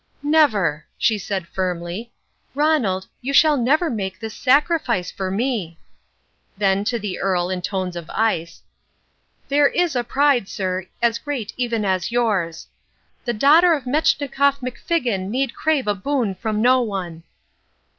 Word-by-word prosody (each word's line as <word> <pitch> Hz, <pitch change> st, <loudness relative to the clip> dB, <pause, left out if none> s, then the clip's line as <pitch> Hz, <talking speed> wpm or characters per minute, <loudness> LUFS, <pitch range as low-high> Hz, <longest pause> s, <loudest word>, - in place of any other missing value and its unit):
"Never," 215 Hz, -, +2 dB
she 220 Hz, -2 st, +1 dB
said 190 Hz, -2 st, -4 dB
firmly. 180 Hz, +5 st, -4 dB, 0.4 s
"Ronald, 270 Hz, -12 st, +1 dB, 0.2 s
you 270 Hz, +3 st, -3 dB
shall 305 Hz, +1 st, +6 dB
never 285 Hz, +7 st, +2 dB
make 195 Hz, -8 st, -4 dB
this 220 Hz, -1 st, -6 dB
sacrifice 275 Hz, -, +1 dB
for 190 Hz, -1 st, -4 dB
me." 200 Hz, -5 st, -2 dB, 0.8 s
Then 195 Hz, -1 st, +2 dB
to 235 Hz, +2 st, 0 dB
the 200 Hz, -4 st, -5 dB
Earl, 180 Hz, -2 st, 0 dB
in 185 Hz, -1 st, -2 dB
tones 185 Hz, -1 st, -3 dB
of 170 Hz, -2 st, -7 dB
ice, 170 Hz, -7 st, -1 dB, 0.8 s
"There 285 Hz, +1 st, +4 dB
is 345 Hz, -1 st, 0 dB
a 245 Hz, -, +1 dB
pride, 265 Hz, -4 st, +2 dB
sir, 185 Hz, -2 st, -3 dB, 0.2 s
as 235 Hz, -1 st, +2 dB
great 265 Hz, -8 st, -4 dB
even 235 Hz, -4 st, -1 dB
as 185 Hz, +1 st, 0 dB
yours. 205 Hz, -9 st, 0 dB, 0.6 s
The 240 Hz, -, 0 dB
daughter 310 Hz, +9 st, +5 dB
of 285 Hz, -, -6 dB
Metschnikoff 280 Hz, 0 st, +1 dB
McFiggin 245 Hz, -, -2 dB
need 260 Hz, +3 st, -1 dB
crave 310 Hz, -4 st, 0 dB
a 205 Hz, -, +1 dB
boon 230 Hz, 0 st, -1 dB
from 215 Hz, +2 st, -2 dB
no 255 Hz, +1 st, +5 dB
one." 185 Hz, -7 st, -4 dB
225 Hz, 145 wpm, -21 LUFS, 190-275 Hz, 0.8 s, shall